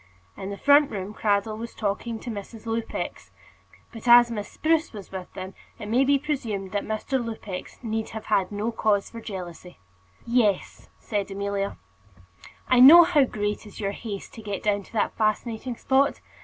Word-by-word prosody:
In 190 - -6
the 200 - -5
front 285 +3 +5
room 200 0 -5
Cradell 215 0 0
was 230 0 -7
talking 220 +2 -2
to 240 - -5
Mrs. 215 +2 -8
Lupex; 225 0 -4 0.6
but 230 +1 -9
as 240 0 +8
Miss 210 -3 -4
Spruce 320 -2 0
was 205 -3 -10
with 185 -1 -7
them, 190 +1 -6 0.2
it 210 - -7
may 240 +5 +3
be 280 +1 +4
presumed 230 -10 -3
that 205 0 -1
Mr. 240 +4 -2
Lupex 215 -5 -7
need 220 -1 -2
have 220 -1 -7
had 195 -3 +1
no 210 +3 -2
cause 210 -3 0
for 230 - -8
jealousy. 180 -4 -8 0.5
"Yes," 235 -5 0
said 205 -3 -3
Amelia; 200 0 -3 0.9
"I 255 - +4
know 315 +7 +11
how 315 -5 +4
great 210 -2 -3
is 205 - -12
your 200 -2 -1
haste 205 -1 -7
to 225 - -9
get 205 -2 -5
down 205 -1 +1
to - - -20
that 215 - 0
fascinating 220 +3 -1
spot. 270 +4 +2
220 Hz, 175 wpm, -25 LUFS, 200-240 Hz, 0.9 s, know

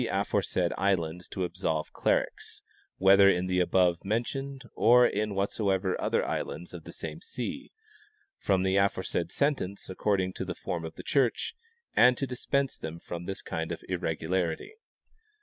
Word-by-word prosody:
aforesaid 90 -2 0
islands 90 -3 0
to 95 - -3
absolve 85 -3 -2
clerics, - - -1 0.3
whether 100 +1 +7
in 90 -1 +2
the 90 0 +1
above 90 -1 +3
men 110 +4 +1
tioned 135 0 -6
or 125 +2 +6
in 105 -2 0
whatsoever 95 -1 0
other - - +1
islands 85 +4 -4
of 85 -3 -9
the - - -8
same 80 0 -7
sea, 275 - -5 0.7
from 95 -2 +2
the 95 +1 +2
aforesaid 95 -3 0
sentence 100 -11 -1
according 95 -1 0
to - - -4
the 90 -2 -4
form 85 -2 -4
of 80 0 -7
the - - -9
church, 135 - +1 0.4
and 125 0 +6
to 135 - -1
dispense 135 +2 -1
them 80 +1 -5
from 85 0 -7
this 95 +1 -5
kind 80 0 -3
of - - -5
irregularity. 85 - -2
95 Hz, 155 wpm, -29 LUFS, 90-110 Hz, 0.7 s, whether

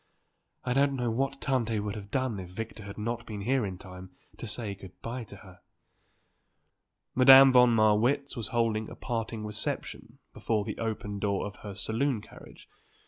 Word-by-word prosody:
"I 125 - 0
don't 140 +1 +3
know 120 -3 -1
what 135 +3 -1
Tante 115 -5 0
would 105 0 -3
have 100 -1 -8
done 130 -5 -1
if 90 -1 -8
Victor 110 +2 -7
had 100 - -8
not 115 +2 -3
been 105 -2 -5
here 130 +4 +1
in 95 -1 -6
time 90 0 -11 0.3
to 120 - -6
say 105 -1 -4
good 95 -2 -13
bye 120 +2 -4
to - - -11
her." 95 -3 -15 1.5
Madame 135 +1 +9
von 125 -1 +7
Marwitz 115 +6 +2
was 115 -4 -3
holding 115 -3 0
a - - -9
parting 115 -2 -4
reception 105 -1 -4 0.2
before 110 -3 -1
the 110 - -5
open 105 -2 -3
door 100 -1 0
of 105 0 -7
her 100 -2 -8
saloon 115 +5 0
carriage. - - -14
110 Hz, 175 wpm, -29 LUFS, 105-125 Hz, 1.5 s, Madame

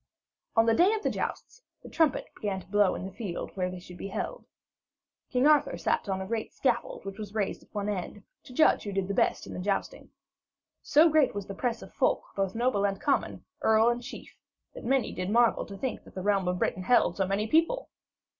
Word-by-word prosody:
On 225 - +5
the 225 - +4
day 360 - +5
of 430 - -5
the - - +1
jousts - - -5 0.2
the - - -10
trumpets 320 -5 +1
began 200 -2 -3
to - - -13
blow 205 0 +3
in - - -5
the 190 - -6
field 195 -3 -5
where 185 -1 -1
they 180 - -7
should 180 0 -12
be - - -5
held. - - -5 0.8
King 250 +1 +2
Arthur 295 - +4
sat 170 +4 -1
on 190 0 -1
a 190 - -4
great 220 +2 -3
scaffold 240 -6 -1
which 195 +2 -7
was 210 0 -7
raised 205 -3 -1
at - - -23
one 205 -1 -3
end, 205 0 -4 0.2
to - - -12
judge 280 +5 +4
who 205 - -5
did 195 0 -1
best - - +1
in - - -8
the - - -5
jousting. 195 +2 -2 0.7
So 310 +3 +5
great 310 -7 +3
was 200 -1 -4
the 195 - -6
press 235 +3 -2
of - - -13
folk, - - +1
both 195 0 -1
noble 235 -3 +1
and 195 -1 0
common, 280 - -1 0.2
earls 220 +1 +4
and 240 0 -3
chiefs, 245 - -9 0.4
that - - -9
many 265 +1 +1
did 185 +1 -3
marvel 235 +2 +3
to 200 - -8
think 260 +4 -3
that - - -16
the 185 - -4
realm 200 -2 +2
of 180 0 0
Britain 185 - -1
held 240 +7 +3
so 190 -2 +1
many 200 +2 0
people. 330 - +1
210 Hz, 225 wpm, -29 LUFS, 195-250 Hz, 0.8 s, On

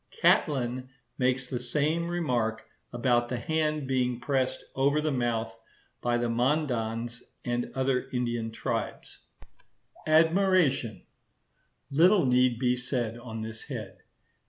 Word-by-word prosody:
Catlin 130 - +2 0.3
makes 130 0 +1
the 125 -1 -3
same 150 +7 0
remark 125 -11 -1 0.3
about 120 0 +2
the 125 - -3
hand 155 +2 -1
being 125 -2 0
pressed 130 -1 -1
over 140 +3 +2
the 155 0 0
mouth 115 -3 -1 0.5
by 120 0 +1
the 120 0 0
Mandans 120 -2 -1 0.2
and 120 0 -1
other 130 -1 0
Indian 120 -2 -1
tribes. 110 - -4 0.9
Admiration.—Little 160 - +1
need 125 -1 +3
be 125 0 +2
said 125 -3 -2
on 115 -2 -7
this 110 0 -7
head. 110 -9 -7
125 Hz, 110 wpm, -28 LUFS, 120-145 Hz, 0.9 s, need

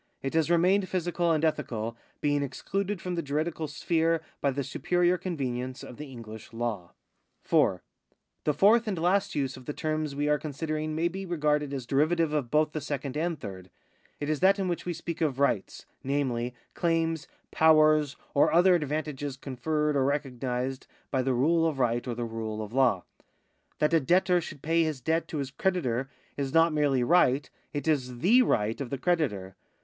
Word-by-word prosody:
It 135 - -2
has 160 -1 +2
remained 185 +3 +3
physical 175 -1 0
and 160 0 +2
ethical, 115 -7 -2 0.3
being 145 -1 +1
excluded 195 +8 -3
from 180 +1 -4
the 170 - -1
juridical 155 +2 -2
sphere 165 +2 0 0.2
by 140 - +2
the 140 +1 -2
superior 175 +6 +1
convenience 130 -8 -4
of 125 - -10
the 150 - -7
EngUsh 110 -3 -9
Imv. 115 -7 -3 0.5
4. - - +2 0.6
The 150 - +2
fourth 225 +3 +5
and 200 -4 -1
last 180 +4 +1
use 135 -3 -1
of 130 - -13
the 150 - -2
terms 155 -2 -2
we 145 +1 0
are 150 0 +2
considering 155 +1 -3
may 165 +2 +1
be 190 +3 -5
regarded 150 -5 0
as 135 -3 -4
derivative 155 +4 +2
of 145 -6 -1
both 150 +2 +2
the 155 - -4
second 140 -1 -4
and 165 0 -1
third. 95 -3 -8 0.5
It 145 - -3
is 155 -1 0
that 195 +2 +5
in 195 -2 -1
which 175 0 -3
we 175 - 0
speak 170 +1 -6
of 145 -5 +1
rights, 135 -8 0 0.2
namely, 125 -3 -1 0.2
claims, 165 -2 0 0.2
powers, 155 -2 +4 0.2
or 140 - +4
other 180 +3 +5
advantages 150 -3 -2
conferred 150 +3 -1
or 135 - +3
recognised 130 -2 -2 0.2
by 130 - +1
the 130 0 0
rule 165 +6 +3
of 155 -4 -2
right 120 -1 0
or 120 - -2
the 120 0 -3
rule 110 -1 -4
of 105 +2 -9
law. 125 -8 +3 0.7
That 150 +2 +1
a 165 - +6
debtor 180 +4 +3
should 145 -3 -9
pay 165 +2 +2
his 155 -4 -2
debt 160 +6 0
to 155 - -5
his 135 -2 -3
creditor 135 -8 -1 0.3
is 140 0 -3
not 165 0 +5
merely 145 -4 +2
right, 140 -2 +3 0.2
it 145 +2 -4
is 130 -5 0
the 220 - +5
right 110 - +1
of 135 - -4
the 140 - -3
creditor. 125 - -1
150 Hz, 185 wpm, -28 LUFS, 130-165 Hz, 0.7 s, a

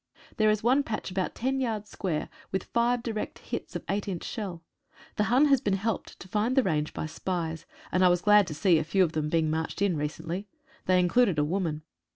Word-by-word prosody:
There 215 -1 +4
is 215 0 +1
one 255 +5 +4
patch 220 -7 -4
about 185 0 -2
ten 265 +3 -1
yards 220 -5 -2
square, 165 -6 -2 0.2
with 190 -1 -1
five 235 0 +1
direct 220 -3 -4
hits - - -6
of - - -3
eight 200 +1 -1
inch 185 -4 -3
shell. 185 -7 -5 0.5
The 210 - +2
Hun 255 +6 +4
has 275 -4 +4
been 195 - +1
helped 215 +2 -3
to 180 - -9
find 215 +6 0
the 265 - +6
range 155 -6 0
by - - -4
spies, 165 0 -4 0.2
and 185 - +3
I 180 - +7
was 175 0 +2
glad 210 -2 +6
to 155 - -5
see 170 0 +4
a - - -1
few 185 +5 +3
of 165 - 0
them 155 -1 -1
being 160 -1 +1
marched 160 +3 -2
in 200 -3 +2
recently. 165 +6 -4 0.4
They 185 0 +5
in 180 - +3
cluded 195 -3 +3
a 150 - +3
woman. 160 -2 -2
190 Hz, 225 wpm, -28 LUFS, 165-215 Hz, 0.5 s, I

